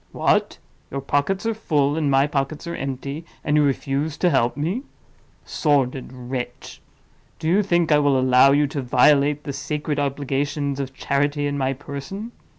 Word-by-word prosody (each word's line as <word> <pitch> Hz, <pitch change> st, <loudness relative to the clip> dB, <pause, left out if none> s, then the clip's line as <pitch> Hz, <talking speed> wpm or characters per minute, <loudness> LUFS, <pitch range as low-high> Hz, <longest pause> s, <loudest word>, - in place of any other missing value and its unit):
What! -, -, +1 dB, 0.3 s
your 140 Hz, -, -4 dB
pockets 145 Hz, +9 st, 0 dB
are 225 Hz, -, +1 dB
full, 150 Hz, -9 st, +1 dB
and 155 Hz, -3 st, 0 dB
my 135 Hz, 0 st, +4 dB
pockets 145 Hz, +2 st, -2 dB
are 170 Hz, -, -4 dB
empty; 140 Hz, +3 st, -5 dB, 0.2 s
and 150 Hz, -, +1 dB
you 150 Hz, -, +5 dB
refuse 140 Hz, +2 st, -1 dB
to 180 Hz, -, +2 dB
help 125 Hz, -2 st, +1 dB
me? 170 Hz, -, -1 dB, 0.6 s
Sordid 135 Hz, -4 st, 0 dB
wretch! 125 Hz, -1 st, -6 dB, 0.6 s
do 160 Hz, -, -4 dB
you 185 Hz, +5 st, +4 dB
think 175 Hz, -5 st, +1 dB
I 150 Hz, -, +6 dB
will 140 Hz, -2 st, +3 dB
allow 130 Hz, +1 st, +5 dB
you 145 Hz, +1 st, +4 dB
to 140 Hz, 0 st, -3 dB
violate 140 Hz, +3 st, +3 dB
the 140 Hz, -, -5 dB
sacred 145 Hz, +2 st, -3 dB
obligations 140 Hz, 0 st, -2 dB
of 135 Hz, -1 st, -5 dB
charity 145 Hz, +2 st, 0 dB
in 145 Hz, 0 st, -1 dB
my 135 Hz, -1 st, 0 dB
person? 145 Hz, -, -7 dB
145 Hz, 165 wpm, -22 LUFS, 135-150 Hz, 0.6 s, I